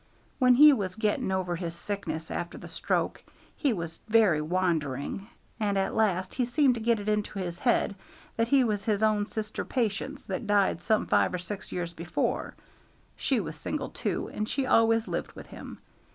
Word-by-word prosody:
When 250 -1 +6
he 295 +3 +9
was 190 -7 -2
getting 210 -3 0
over 185 -2 -1
his 170 -1 -4
sickness 170 -4 -4
after 175 - -4
the - - -9
stroke - - -1 0.3
he 285 - +1
was 170 -5 -4
very 210 -8 +4
wandering, 160 0 -1 0.3
and 205 -2 +1
at 195 - 0
last 190 -4 +1
he 255 - 0
seemed 260 +2 +3
to 235 - -4
get 230 0 +2
it 205 - -7
into 210 -1 -1
his 180 -2 -4
head 240 -4 +2 0.4
that 230 0 +1
he 275 +1 +5
was 210 -4 -1
his 215 -2 +1
own 210 -1 +2
sister 215 -1 -4
Patience 255 +3 -2
that 220 - -4
died 200 -4 +2
some 215 +3 +2
five 105 - +2
or - - 0
six 190 +3 -7
years 175 -1 -3
before: 170 0 -2 0.6
she - - +1
was - - -5
single - - -4
too, - - -2
and 215 +1 -3
she 275 -1 0
always 225 -2 +4
lived - - -3
with - - -10
him. - - -10
205 Hz, 185 wpm, -28 LUFS, 180-225 Hz, 0.6 s, he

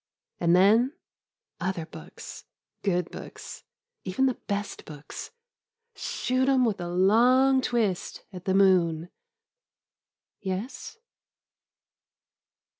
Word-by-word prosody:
And 170 0 +4
then 220 +9 +5 0.3
— - - -67 0.3
other 175 -2 -2
books, - - -11 0.4
good 180 -3 0
books, - - -9 0.4
even 190 +8 +1
the 260 - +2
best 200 0 -3
books 150 -1 -9 0.3
— 470 0 -58
shoot 260 +1 0
'em 260 -2 +4
with 215 -6 -1
a 175 - -3
long 245 +9 +4
twist 225 -7 -1
at 180 -1 -9
the 190 - +1
moon 175 -4 +3 0.7
— - - -52
^yes? 200 - -5
200 Hz, 110 wpm, -27 LUFS, 180-255 Hz, 0.7 s, then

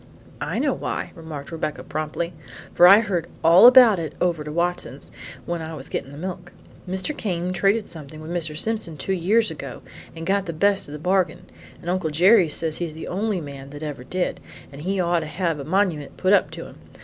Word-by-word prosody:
"I - - -2
know - - +1
why," - - -4
remarked 160 -4 -8
Rebecca 160 -2 -4
promptly, 155 +3 -3 0.4
"for 175 - +7
I 200 +4 +9
heard 180 -6 -2 0.2
all 170 +7 +9
about 245 -6 +8
it 160 -3 -4
over 170 -4 0
to 150 - -6
Watson's 170 -5 -2 0.3
when 170 -1 -3
I 160 0 -6
was 135 -3 -7
getting - - -4
the 140 - -11
milk. 180 +1 -6 0.4
Mr. 190 +11 -2
Came 180 -3 -2
traded 200 +4 +2
something 155 -3 -10
with 155 +2 -8
Mr. 160 -3 -2
Simpson 215 -6 -2
two 195 - -2
years 205 +6 +2
ago - - -8 0.3
and 165 0 -6
got 195 0 0
the 170 - -3
best 200 +4 +2
of - - -8
the - - -5
bargain, 180 +2 0 0.4
and - - -11
Uncle 180 -2 0
Jerry 180 +3 +5
says 155 +1 0
he's 165 -3 -4
the 160 - -7
only 200 0 -1
man 140 -2 -9
that 145 +2 -9
ever 145 -5 -5
did, 180 +7 -2 0.3
and 140 +1 -10
he 190 +4 -1
ought 175 -1 +2
to 155 - -5
have 165 0 -2
a - - -5
monument 165 -3 -1
put 185 +1 +2
up - - +4
to - - -8
him. - - -13
170 Hz, 210 wpm, -23 LUFS, 155-190 Hz, 0.4 s, I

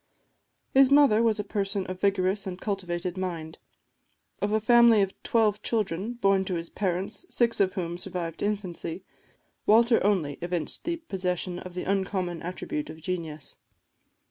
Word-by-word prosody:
His 270 -1 +7
mother 280 -6 +6
was 225 -2 +2
a - - 0
person 200 -1 -2
of 185 - -5
a - - -32
vigorous 195 0 +1
and 180 -1 -5
cultivated 180 -3 -3
mind. 165 -4 -4 0.8
Of 205 - 0
a 215 - +3
family 235 -1 +6
of 195 - -3
twelve 215 -2 +2
children, 210 -1 -1
born 195 -5 +2
to 185 - -2
his 165 0 -5
parents, 190 - -2
six 235 -2 +2
of 190 -2 +3
whom 175 -2 -3
survived 175 -3 -5
infancy, 190 -4 -3 0.6
Walter 230 +2 +5
only 180 -9 +1
evinced 175 -3 -3
the 340 +1 0
possession 180 - -3
of 180 -1 -9
the 180 - -3
uncommon 190 -3 -1
attribute 170 -4 -4
of 160 0 -9
genius. 160 -4 -5
190 Hz, 155 wpm, -27 LUFS, 175-210 Hz, 0.8 s, His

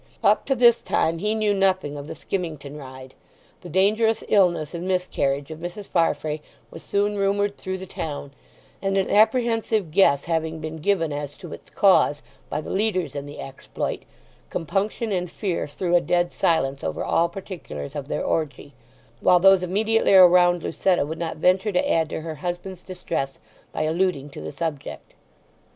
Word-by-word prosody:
Up - - +4
to 270 - +2
this 235 -1 +5
time 165 +1 0
he 210 +4 0
knew 215 -2 +1
nothing 185 -6 +1
of 145 0 -7
the - - -7
skimmington 155 -6 -5
ride. 130 -2 -10 0.5
The 175 - -10
dangerous 215 +5 +2
illness 175 -7 +2
and 175 +1 -5
miscarriage 145 -6 -1
of 155 - -7
Mrs. 175 +4 -6
Farfrae 155 -3 0 0.3
was 165 - -10
soon 205 +1 0
rumoured 200 +1 +1
through 190 0 -5
the 190 - -8
town, 145 -5 -6 0.5
and 195 0 0
an 190 - 0
apprehensive 225 -4 +2
guess 150 -6 +4
having 160 -1 -1
been 160 0 -6
given 165 -2 0
as 145 0 -5
to 175 -5 -9
its - - -12
cause 185 -7 +3 0.3
by - - -2
the - - -7
leaders 190 -7 0
in 140 0 -5
the 145 - -10
exploit, 135 0 -5 0.5
compunction 205 +6 -2
and 180 -2 -1
fear 185 -2 -3
threw 175 +4 -1
a 175 - +5
dead 175 0 0
silence 135 -5 +1
over 80 -1 -2
all 170 +1 +2
particulars 180 -5 -8
of 140 -2 -5
their - - -2
orgie; 150 -2 -2 0.5
while 180 - +5
those 195 0 +6
immediately 210 +3 +2
around 180 -1 +6
Lucetta 180 -3 +1
would 160 +2 -6
not 165 -2 -3
venture 185 +6 +2
to 180 - +1
add 160 -2 +2
to - - -4
her 160 0 -5
husband's 180 +1 -5
distress 180 -7 -4 0.4
by - - -2
alluding 160 -3 0
to - - -9
the - - -6
subject. 150 -1 -5
175 Hz, 170 wpm, -24 LUFS, 155-195 Hz, 0.5 s, those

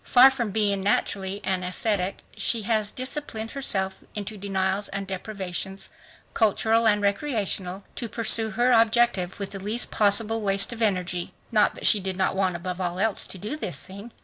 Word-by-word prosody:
Far 260 +2 +7
from 240 -5 -2
being 200 -1 +1
naturally 195 0 0
an 190 -1 -1
ascetic, 185 +1 -2
she 230 -3 +1
has 215 -1 +1
disciplined 255 -4 -5
herself 190 -8 -1 0.2
into 210 +1 -4
denials 195 0 -1
and 195 0 -4
deprivations, 190 -1 -5 0.4
cultural 225 +1 +2
and 210 -1 +3
recreational, 200 -4 -2
to 235 - -4
pursue 225 -1 +1
her 245 +1 +3
objective 225 -5 +2
with 200 - -5
the 195 - -6
least 215 +5 0
possible 220 +2 +3
waste 200 +3 +3
of 235 - -8
energy. 180 -4 -1 0.2
Not 215 -2 +3
that - - -6
she 210 - +6
did 190 -1 -3
not 190 0 +1
want 190 -2 0
above 180 +1 -5
all 175 -1 -2
else 215 +1 0
to - - -5
do 210 +10 -5
this 175 - -3
thing. 200 +5 -10
205 Hz, 175 wpm, -25 LUFS, 190-225 Hz, 0.4 s, Far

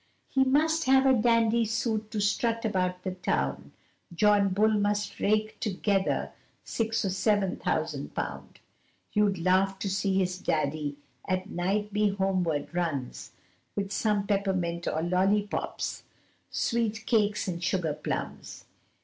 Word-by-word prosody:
He 265 - +3
must 315 +4 +2
have 265 0 +5
a 265 - +6
dandy 230 -1 +3
suit 220 -1 -1
to 215 - -3
strut 230 +3 0
about 185 -3 -1
the 185 - -2
town. 180 0 -2 0.4
John 200 +3 +4
Bull 205 +4 +3
must 205 0 0
rake 215 +1 +1
together 200 -2 0 0.3
six 225 -1 -1
or 190 - 0
seven 195 0 +1
thousand - - -2
pound, - - -5 0.5
You'd 210 -2 +2
laugh 190 +3 +2
to 195 - -3
see 190 0 0
his 185 -1 0
daddy, 150 -2 -1 0.3
at 185 0 -2
night 200 +4 -1
he 210 0 +3
homeward 185 -6 -1
runs, 160 -8 -3 0.4
With 195 -1 -2
some 210 -2 +1
peppermint 185 -4 -1
or 160 - -1
lollipops, 195 +4 0 0.5
sweet 225 -2 -1
cakes 210 -3 +1
and 170 -1 -3
sugar 180 -4 0
plums. - - -5
200 Hz, 130 wpm, -28 LUFS, 185-215 Hz, 0.5 s, a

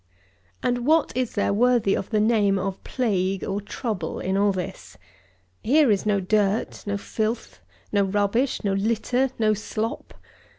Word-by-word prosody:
106. - - +1
And 245 +1 -1
what 320 0 +3
is 250 -2 -1
there 205 -1 +1
worthy 235 -2 +3
of - - -2
the 215 - +1
name 210 -3 +3
of 190 0 -4
plague, 195 -6 -1
or 200 +1 -2
trouble, 205 -5 -4
in 190 +1 -1
all 200 +1 +3
this? 185 -2 -6 0.6
Here 280 0 +4
is 205 +1 0
no 205 -1 +2
dirt, 205 +2 0
no 200 0 -1
filth, 220 +3 -3 0.3
no 200 -1 +3
rubbish, 205 +7 0
no 200 -2 +1
litter, 230 +6 +1
no 215 -1 +3
slop. 215 +2 -4
210 Hz, 160 wpm, -24 LUFS, 195-235 Hz, 0.6 s, Here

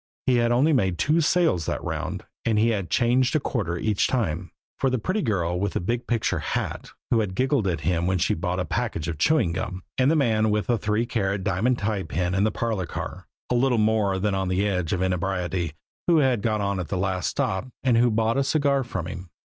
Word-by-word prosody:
He 125 -1 +3
had 120 0 +2
only 140 +7 +3
made 95 -9 +1
two 155 - +2
sales 160 - +2
that - - -2
round, - - -4 0.2
and 115 -2 +1
he 110 +2 +4
had 100 -6 -1
changed 125 +2 +2
a - - +4
quarter 105 - -2
each 105 +2 +1
time 90 -8 -1 0.3
for 135 - +2
the 130 - 0
pretty 185 - -1
girl 90 - 0
with 100 0 -1
the - - 0
big 115 +7 -2
picture 115 -2 0
hat, - - -3 0.2
who 115 - +4
had 100 -4 -2
giggled 130 -3 +1
at 85 -4 -1
him 85 +2 0
when 95 0 +1
she 90 - +1
bought 90 +2 -2
a 90 - -1
package 80 0 -2
of 80 -3 -4
chewing 120 - +3
gum; 95 0 -4 0.2
and 130 +2 +4
the 160 - +3
man 110 -7 +2
with 105 0 +1
the 120 -2 +1
three 105 +2 0
carat 100 -4 -1
diamond 105 +7 +1
tie 105 -2 -1
pin 90 +3 -2
in 95 +1 +2
the - - +3
parlor 110 -6 -2
car, - - -6 0.2
a - - +4
little 125 0 +2
more 105 -3 +2
than 100 +2 0
on 95 -1 -1
the 95 +3 +1
edge 90 -5 -1
of 95 0 0
inebriety, 90 -2 -1 0.3
who 170 -2 +5
had 130 -7 +3
got 110 -2 0
on 100 -1 -1
at 90 - -3
the 95 - -2
last 95 -1 -1
stop, 95 +6 -1 0.2
and 125 -3 +3
who 120 +1 +5
had 115 -3 +1
bought 115 +2 +1
a - - +2
cigar 140 -1 +2
from 120 -8 -4
him. 90 0 -7
105 Hz, 235 wpm, -25 LUFS, 90-120 Hz, 0.3 s, who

